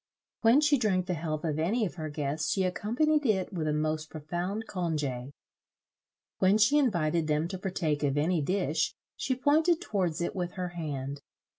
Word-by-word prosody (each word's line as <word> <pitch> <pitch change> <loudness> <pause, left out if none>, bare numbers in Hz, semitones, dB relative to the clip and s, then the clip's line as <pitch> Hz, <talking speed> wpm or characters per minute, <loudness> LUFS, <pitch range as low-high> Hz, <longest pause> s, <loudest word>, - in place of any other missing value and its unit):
When 235 +5 +6
she 295 -2 +4
drank 190 -6 +1
the 180 - -1
health 155 -2 -3
of 155 -2 -1
any 215 +8 +1
of 180 - -4
her 155 -3 -5
guests, 150 +1 -2
she 190 - +1
accompanied 245 +12 +1
it 210 -5 +1
with 160 -4 -2
a - - +2
most 155 +1 -1
profound 175 +7 -3
congè. 150 -8 -2 1.1
When 190 +3 +4
she 220 +8 +5
invited 170 - +1
them 150 +1 +1
to 190 -1 -5
partake 170 -6 -1
of 145 -1 +1
any 160 +2 +2
dish, 160 -2 0 0.2
she 260 - -1
pointed 315 +6 +3
towards 185 - -1
it 170 - -2
with 180 -1 -3
her 180 -1 -3
hand. 145 -5 -5
175 Hz, 175 wpm, -29 LUFS, 155-205 Hz, 1.1 s, When